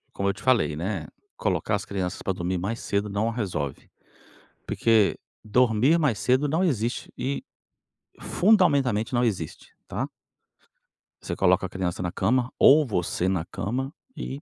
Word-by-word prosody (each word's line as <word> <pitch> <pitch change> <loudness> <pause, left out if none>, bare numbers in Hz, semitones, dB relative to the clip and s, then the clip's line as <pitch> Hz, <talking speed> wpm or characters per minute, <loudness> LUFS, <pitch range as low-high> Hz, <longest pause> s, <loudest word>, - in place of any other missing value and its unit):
como 100 0 -1
eu - - +2
te - - -13
falei, 125 - +2
né, 85 -1 -3 0.3
colocar - - 0
as - - -5
crianças 95 -3 -3
pra 95 - 0
dormir 90 0 -2
mais 105 +6 -3
cedo 100 +1 -1
não 105 +3 0
resolve, 90 - -4 0.8
porque 110 -3 +3 0.3
dormir 125 +7 +3
mais 140 -9 +1
cedo 130 +4 +2
não 160 +6 +1
existe 120 - -1
e 140 +2 -2 0.8
fundamentalmente 140 - +3
não 120 0 +3
existe, 90 -9 -4
tá. - - -2 1.2
Você - - -4
coloca 95 0 +3
a - - -16
criança 90 -2 -3
na 90 -1 -2
cama 125 +5 +1
ou 155 +3 +7
você 90 -4 -1
na 90 -4 -1
cama 130 - -3 0.2
e 135 +2 -5
110 Hz, 150 wpm, -25 LUFS, 95-130 Hz, 1.2 s, ou